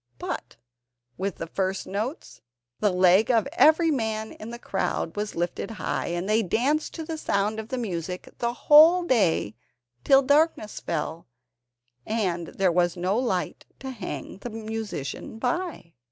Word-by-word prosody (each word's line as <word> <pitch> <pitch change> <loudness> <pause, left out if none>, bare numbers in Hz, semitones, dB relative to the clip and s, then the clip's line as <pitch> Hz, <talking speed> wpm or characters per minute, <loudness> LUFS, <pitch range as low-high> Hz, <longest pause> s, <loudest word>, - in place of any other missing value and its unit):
But - - -5 0.6
with 195 0 -3
the - - -5
first 190 +3 -2
notes, 220 - -5 0.4
the 210 - +3
leg 185 +4 +4
of 235 0 +3
every 325 0 +5
man 220 -5 -2
in 215 - -9
the 235 - -6
crowd 195 -6 -2
was 210 0 -3
lifted 175 +3 -2
high, 225 - -3
and 175 +2 -2
they 215 +2 +3
danced 265 - 0
to 320 - -5
the 320 0 -5
sound 210 -1 0
of 220 - -6
the 260 - -3
music 180 -6 -4
the 235 0 0
whole 315 +8 +7
day 195 - +2 0.5
till 270 0 +6
darkness 285 -5 +2
fell, 160 0 -4 0.8
and 180 - -1
there 190 +1 +1
was 175 0 +1
no 185 +3 0
light 225 -7 -2
to 265 0 -6
hang 185 - -6
the 245 - -6
musician 220 - -5
by. 260 - -3
215 Hz, 155 wpm, -26 LUFS, 180-255 Hz, 0.8 s, whole